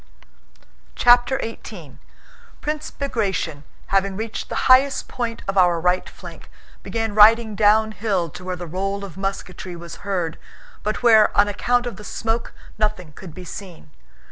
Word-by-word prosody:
CHAPTER 245 +2 +5
XVIII 200 - -9 0.6
Prince 300 0 -3
Bagratión, 195 - -2 0.3
having 195 0 +1
reached 220 0 -5
the - - -2
highest 270 +2 +4
point 235 -2 -4
of 195 0 +1
our 175 -2 +4
right 180 +2 +1
flank, - - -12 0.3
began 225 -2 -3
riding 220 +1 +6
downhill 210 -3 +2
to 180 - -10
where 185 0 -3
the 175 0 -7
roll 195 +4 -3
of 185 - -11
musketry 190 -2 -5
was 170 -1 -9
heard 180 -5 -3 0.4
but 215 +3 -3
where 220 -3 +6
on 205 - +6
account 245 +4 0
of 240 - -5
the 210 - -10
smoke 225 +2 -3 0.3
nothing 210 -7 -1
could 170 -3 -11
be 185 - -9
seen. 180 -3 -10
205 Hz, 145 wpm, -22 LUFS, 185-225 Hz, 0.6 s, riding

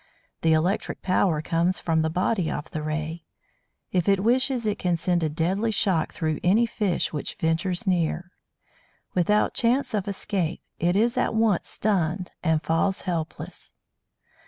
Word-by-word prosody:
The 160 -1 +4
electric 175 +6 0
power 180 -4 +2
comes 170 +3 +1
from 160 -1 +1
the 160 - +1
body 180 +1 0
of 145 - -5
the 155 - -3
Ray; 155 +2 -3 0.7
if 180 0 +1
it 195 -1 +3
wishes 255 +1 +2
it 210 -1 -1
can 175 -2 +1
send 175 0 +1
a 160 - +1
deadly 185 +8 0
shock 190 -6 +1
through 155 -3 -2
any 210 +7 +4
fish 205 -7 -1
which 150 - -4
ventures 175 +5 0
near. 180 -1 0 0.8
Without 205 +4 +2
chance 245 +3 +1
of 205 -2 -1
escape, 190 -4 -2 0.2
it 175 +2 +2
is 235 +5 +2
at - - +1
once 220 -5 +2
stunned, 185 -3 -1
and 160 -2 +1
falls 165 +4 +1
helpless. 170 -4 -5
180 Hz, 155 wpm, -25 LUFS, 160-205 Hz, 0.8 s, The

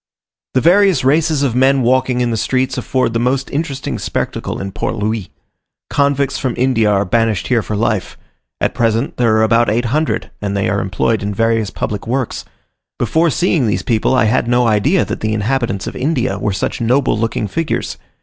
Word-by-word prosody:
The 130 - +3
various 185 -1 +4
races 155 +1 +2
of 135 -5 +1
men 130 +1 +3
walking 125 0 +2
in 120 -1 0
the - - 0
streets 130 +4 0
afford 130 -3 -1
the 115 - 0
most 130 +3 0
interesting 145 -2 -3
spectacle - - -3
in 100 0 -5
Port - - -3
Louis. 105 -2 -2 0.6
Convicts 140 -1 +1
from 130 -3 -2
India 120 -4 +2
are 100 -1 +2
banished 110 0 0
here 120 -3 +3
for 105 - -4
life; 105 -2 -1 0.4
at - - 0
present 115 +1 0
there 115 -3 +3
are 110 - +3
about 115 +2 +3
800, 120 +8 -1
and 100 -1 -2
they 100 - 0
are 100 +2 0
employed 100 +4 0
in 100 0 -3
various 115 -1 +1
public 105 +3 -4
works. 130 0 -2 0.5
Before 165 +1 +2
seeing 160 -4 +1
these 105 - -1
people, 115 +2 +1
I 125 - +3
had 115 +2 +1
no 120 0 +3
idea 115 - +2
that - - -4
the 110 0 -1
inhabitants 115 -2 -1
of - - -6
India 130 -3 -1
were 105 - -1
such 95 +4 -3
noble 125 +3 +2
looking 110 -1 -1
figures. 165 +8 -3
120 Hz, 190 wpm, -17 LUFS, 110-135 Hz, 0.6 s, various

